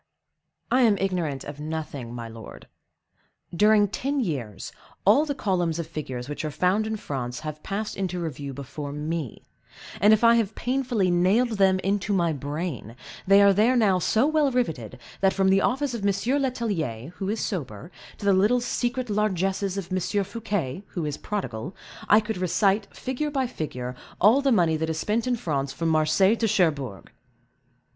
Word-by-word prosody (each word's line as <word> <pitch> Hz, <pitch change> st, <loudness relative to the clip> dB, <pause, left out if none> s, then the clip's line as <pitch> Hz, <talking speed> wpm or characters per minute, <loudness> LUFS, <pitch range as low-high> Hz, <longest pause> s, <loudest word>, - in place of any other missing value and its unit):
"I 255 Hz, -, +4 dB
am 220 Hz, -5 st, +4 dB
ignorant 175 Hz, -8 st, -1 dB
of 145 Hz, 0 st, -8 dB
nothing, 150 Hz, -5 st, -5 dB
my 120 Hz, -1 st, -6 dB
lord; 115 Hz, 0 st, -11 dB, 0.9 s
during 210 Hz, +2 st, +5 dB
ten 275 Hz, +8 st, -2 dB
years, 135 Hz, -, -3 dB, 0.3 s
all 255 Hz, +10 st, +5 dB
the 285 Hz, -, -2 dB
columns 175 Hz, -, 0 dB
of 170 Hz, -, -3 dB
figures 130 Hz, -6 st, -6 dB
which 145 Hz, +2 st, -5 dB
are 155 Hz, -, -2 dB
found 185 Hz, +7 st, +1 dB
in 220 Hz, -, -2 dB
France, 125 Hz, -, -5 dB
have 155 Hz, 0 st, -6 dB
passed 210 Hz, +5 st, -4 dB
into 180 Hz, -2 st, -2 dB
review 145 Hz, -4 st, -5 dB
before 140 Hz, +2 st, -7 dB
me; 150 Hz, -3 st, -4 dB, 0.6 s
and 210 Hz, -, +6 dB
if 220 Hz, +1 st, +4 dB
I 235 Hz, 0 st, +7 dB
have 220 Hz, -2 st, 0 dB
painfully 245 Hz, -7 st, 0 dB
nailed 200 Hz, +6 st, +2 dB
them 190 Hz, -1 st, +5 dB
into 200 Hz, +1 st, 0 dB
my 170 Hz, -4 st, +2 dB
brain, 145 Hz, -, -5 dB, 0.3 s
they 200 Hz, +1 st, +7 dB
are 200 Hz, 0 st, +6 dB
there 220 Hz, +6 st, +3 dB
now 200 Hz, -6 st, +3 dB
so 220 Hz, +8 st, +2 dB
well 305 Hz, -1 st, +3 dB
riveted, 160 Hz, -, -2 dB, 0.2 s
that, 195 Hz, -1 st, +3 dB
from 195 Hz, -1 st, +2 dB
the 195 Hz, +1 st, +4 dB
office 270 Hz, +1 st, 0 dB
of 235 Hz, -, -4 dB
M. 200 Hz, -, +3 dB, 0.3 s
Letellier, 185 Hz, -, -2 dB
who 195 Hz, -, -3 dB
is 215 Hz, +1 st, -1 dB
sober, 150 Hz, -, -4 dB, 0.3 s
to 205 Hz, -, -8 dB
the 200 Hz, -, +5 dB
little 210 Hz, +6 st, +3 dB
secret 245 Hz, +1 st, -2 dB
largesses 195 Hz, -2 st, 0 dB
of 190 Hz, -2 st, -5 dB
M. 185 Hz, -, +1 dB, 0.2 s
Fouquet, 200 Hz, -, -3 dB
who 170 Hz, -4 st, -4 dB
is 150 Hz, -1 st, -3 dB
prodigal, 170 Hz, -, -4 dB, 0.3 s
I 210 Hz, +2 st, +7 dB
could 220 Hz, -1 st, -4 dB
recite, 195 Hz, +3 st, +1 dB
figure 265 Hz, +4 st, -3 dB
by 270 Hz, -3 st, 0 dB
figure, 125 Hz, -, -5 dB, 0.2 s
all 220 Hz, +9 st, +5 dB
the 275 Hz, -1 st, +2 dB
money 170 Hz, -7 st, +3 dB
that 160 Hz, +1 st, -2 dB
is 160 Hz, -, -2 dB
spent 225 Hz, +6 st, 0 dB
in 250 Hz, -, +2 dB
France 140 Hz, -, -2 dB
from 165 Hz, +4 st, -2 dB
Marseilles 160 Hz, +7 st, +3 dB
to 225 Hz, -, +2 dB
Cherbourg." 150 Hz, -, 0 dB
190 Hz, 175 wpm, -25 LUFS, 155-220 Hz, 0.9 s, I